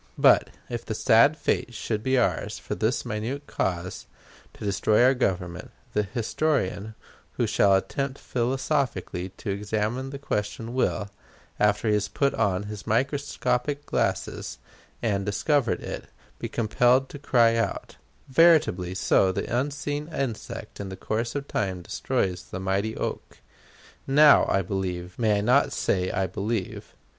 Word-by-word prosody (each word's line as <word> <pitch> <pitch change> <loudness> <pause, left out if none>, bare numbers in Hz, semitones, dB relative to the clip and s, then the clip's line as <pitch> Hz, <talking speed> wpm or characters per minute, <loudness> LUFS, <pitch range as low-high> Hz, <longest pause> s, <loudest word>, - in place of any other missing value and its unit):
But, - - +5 0.2
if 120 -1 -4
the 110 - -4
sad 115 +9 +5
fate 120 -4 -1
should 110 -1 -2
be 130 +3 +1
ours, 125 - 0
for - - -5
this 110 +7 0
most 120 - -3
minute 140 +6 -4
cause, 90 -6 -3 0.5
to - - -8
destroy 100 +3 +3
our 130 +2 +6
Government, 90 -8 -2 0.2
the 105 - +2
historian 110 -1 -1 0.4
who 120 - 0
shall 100 -2 +4
attempt 135 +7 -2
philosophically 125 - -1
to 100 - -4
examine 110 +6 -2
the 140 - -6
question 115 -2 -3
will, 110 -5 0 0.5
after 105 +1 +2
he 105 - +3
has 105 -1 +1
put 140 +5 0
on 100 -3 +1
his 105 0 -8
microscopic 135 +2 0
glasses - - -2 0.5
and 100 -4 +1
discovered 120 +5 +1
it, - - -5 0.3
be - - -4
compelled 120 +4 +2
to 145 - -9
cry 120 -5 +4
out, 115 - -2 0.3
"Veritably 130 - +4
so 95 0 +3
the 115 +5 -3
unseen 145 +3 -2
insect 135 -9 -5
in 100 -1 -5
the 95 - -7
course 115 +3 -2
of 140 0 -3
time 95 -3 -2
destroys 90 +1 -2
the 90 - -6
mighty 95 +3 -1
oak!" - - -4 0.7
Now, 145 +2 +7
I 95 - +2
believe 90 -1 -4
may 110 -3 +3
I - - 0
not 125 +6 +3
say 90 -1 0
I 95 - 0
believe? 100 +2 -4
110 Hz, 150 wpm, -26 LUFS, 100-130 Hz, 0.7 s, Now